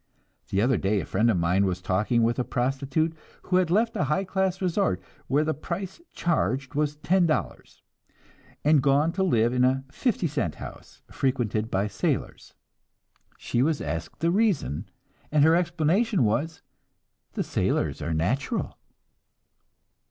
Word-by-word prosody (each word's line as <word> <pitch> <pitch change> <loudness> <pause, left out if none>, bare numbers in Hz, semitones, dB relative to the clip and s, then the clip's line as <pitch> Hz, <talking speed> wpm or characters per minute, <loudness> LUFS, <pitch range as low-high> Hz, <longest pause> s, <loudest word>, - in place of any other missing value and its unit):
The 100 +2 +1
other 125 -1 +3
day 100 +2 +1
a - - -4
friend 110 +5 +1
of 105 - +2
mine 90 +3 +2
was 90 -1 -2
talking 105 +6 +1
with 120 +2 +1
a - - +2
prostitute 135 +6 -1 0.3
who 180 - +1
had 185 -2 +2
left 225 +6 +2
a - - +1
high 150 +7 0
class 190 0 -1
resort, 180 - 0 0.3
where 145 +4 +2
the 155 0 0
price 185 - -6
charged 135 - -1
was 150 0 0
ten 175 +4 +2
dollars, 155 - -3 0.8
and 150 -2 +5
gone 145 +4 +3
to 185 +3 -3
live 120 -9 +2
in 125 0 +2
a 130 +1 +2
"fifty 230 - 0
cent 140 - -1
house," - - -11
frequented 115 -5 -1
by 95 -1 0
sailors. 100 -1 -3 0.8
She 120 - -1
was 155 +2 +1
asked 80 +3 -5
the 165 +1 +2
reason, 190 - 0 0.4
and 150 -1 +4
her 160 +2 +6
explanation 175 - +1
was, 150 +10 -1 0.7
"The - - -1
sailors - - -1
are 80 +3 -2
natural." 95 - -1
140 Hz, 150 wpm, -26 LUFS, 110-170 Hz, 0.8 s, her